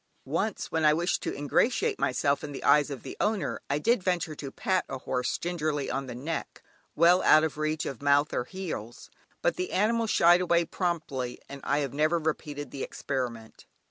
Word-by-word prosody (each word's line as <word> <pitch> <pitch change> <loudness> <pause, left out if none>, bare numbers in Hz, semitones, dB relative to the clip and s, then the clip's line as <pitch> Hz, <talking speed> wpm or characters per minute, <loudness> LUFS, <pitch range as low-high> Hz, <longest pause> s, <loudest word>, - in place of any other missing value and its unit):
Once, 170 +9 -2
when 160 -1 0
I 150 0 +5
wished 175 +2 0
to - - -3
ingratiate 260 - +1
myself 140 0 +1
in 145 - -6
the - - -7
eyes 150 0 +5
of 140 -3 -7
the - - -7
owner, 190 - -1
I 140 - +1
did 230 +8 +2
venture 180 -3 -1
to 145 -2 -7
pat 185 +6 0
a 135 - -4
horse 125 -1 -2
gingerly 155 -5 -2
on 135 -1 -3
the 125 - -6
neck, 150 +7 -5 0.3
well 170 +3 +5
out 155 - +6
of 160 - -1
reach 155 0 -1
of 135 - -5
mouth 145 +1 +3
or 120 - -1
heels, 155 - -7 0.3
but - - +1
the 365 +1 -3
animal 225 +4 +2
shied 175 -3 +5
away 170 -1 +2
promptly, 155 -9 -3
and 140 0 -9
I 145 +2 +1
have 140 -3 -3
never 155 +4 +2
repeated 150 -2 -3
the 135 - -6
experiment. 120 -5 -5
155 Hz, 195 wpm, -28 LUFS, 140-175 Hz, 0.3 s, out